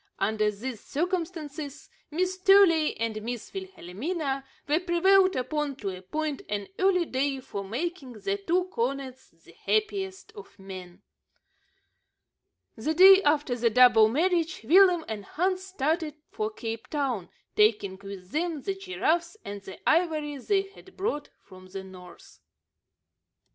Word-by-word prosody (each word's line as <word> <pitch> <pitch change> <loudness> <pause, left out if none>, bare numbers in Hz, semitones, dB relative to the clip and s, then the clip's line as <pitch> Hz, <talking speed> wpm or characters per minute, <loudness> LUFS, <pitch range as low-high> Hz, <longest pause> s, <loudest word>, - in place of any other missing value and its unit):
Under 215 +1 +1
these 220 +3 -6
circumstances, 315 -3 -4 0.2
Miss 365 +4 -1
Truey 375 -5 +5
and 225 -1 -2
Miss 240 +1 -6
Wilhelmina 310 - -4 0.2
were 300 +3 +3
prevailed 370 +2 +4
upon 285 +2 -2
to 200 -7 -4
appoint 290 +11 -4
an 205 -1 -3
early 370 -2 +3
day 270 -1 -1
for 200 -6 -6
making 270 - -4
the 395 - -2
two 365 -2 +1
cornets 260 +1 -3
the - - -21
happiest 400 -2 -2
of 420 - -13
men. 190 -1 -10 1.7
The 300 +8 -2
day 380 +2 +9
after 295 -5 +2
the 235 -1 +2
double 240 -2 +7
marriage, 335 +5 +1
Willem 355 - +5
and 215 -2 -5
Hans 370 - -1
started 315 -3 -1 0.2
for 430 0 -2
Cape 225 - -6
Town, 260 - -2 0.3
taking 210 -3 +2
with 195 -2 -9
them 320 -2 -2
the 390 - -1
giraffes 365 -1 -1
and 200 0 -6
the 190 -1 -10
ivory 310 -3 +2
they 390 +8 +1
had 390 -1 -17
brought 370 -7 -2
from 185 -1 -14
the 190 +1 -7
north. 180 -2 -14
295 Hz, 130 wpm, -27 LUFS, 220-365 Hz, 1.7 s, day